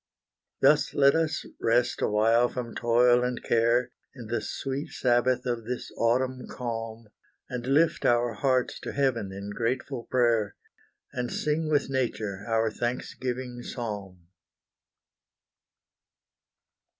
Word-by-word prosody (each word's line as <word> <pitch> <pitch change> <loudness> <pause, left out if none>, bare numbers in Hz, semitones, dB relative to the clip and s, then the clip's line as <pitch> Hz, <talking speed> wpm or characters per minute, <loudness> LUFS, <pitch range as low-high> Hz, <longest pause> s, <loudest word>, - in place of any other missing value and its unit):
Thus - - +4
let 140 -1 +6
us 160 -1 0
rest 120 +2 +1
awhile 115 +3 +3
from 120 -2 -5
toil 120 +1 +4
and 125 -1 -1
care, 120 +2 +2 0.2
In 120 -3 -9
the 115 +2 -2
sweet 135 +2 -4
sabbath 125 0 +1
of 120 -2 -2
this 125 +1 -5
autumn 125 +2 0
calm, 115 -2 -5 0.4
And 125 -2 -5
lift 150 +5 +3
our 120 -1 +3
hearts 130 +2 0
to - - -6
heaven 120 -8 0
in 100 +1 -6
grateful 120 +3 -2
prayer, 115 -5 +1 0.6
And 125 -1 -3
sing 155 +1 -1
with 145 -2 +2
nature 105 -6 -2
our 115 -1 +1
thanksgiving 125 +1 -4
psalm. 100 -8 -6
120 Hz, 115 wpm, -27 LUFS, 115-130 Hz, 0.6 s, let